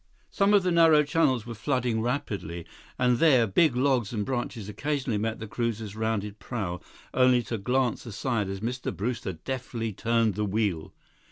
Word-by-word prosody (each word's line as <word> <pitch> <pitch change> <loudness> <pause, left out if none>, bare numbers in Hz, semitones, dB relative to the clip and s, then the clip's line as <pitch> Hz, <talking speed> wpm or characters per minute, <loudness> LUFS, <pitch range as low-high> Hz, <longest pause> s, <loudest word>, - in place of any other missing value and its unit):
Some 200 +1 +3
of 200 - +4
the 180 - +1
narrow 165 -3 +6
channels 140 -6 +1
were 120 - -6
flooding 120 -1 -1
rapidly, 100 - -3 0.3
and 125 -1 +2
there, 135 -8 +5
big 125 - +3
logs 125 -4 +1
and 105 -3 -2
branches 120 -5 -3
occasionally 130 +1 -2
met 110 +1 -2
the 110 - -6
cruiser's 110 -2 -3
rounded 110 -2 -2
prow, 95 -8 -4 0.3
only 125 -1 +4
to 115 -1 -4
glance 125 +2 0
aside 115 -2 -2
as 95 0 -5
Mr. 125 +3 -3
Brewster 115 -2 -3
deftly 115 +3 -4
turned 115 +1 +1
the 105 +3 -2
wheel. 100 -5 -1
115 Hz, 165 wpm, -27 LUFS, 105-130 Hz, 0.3 s, narrow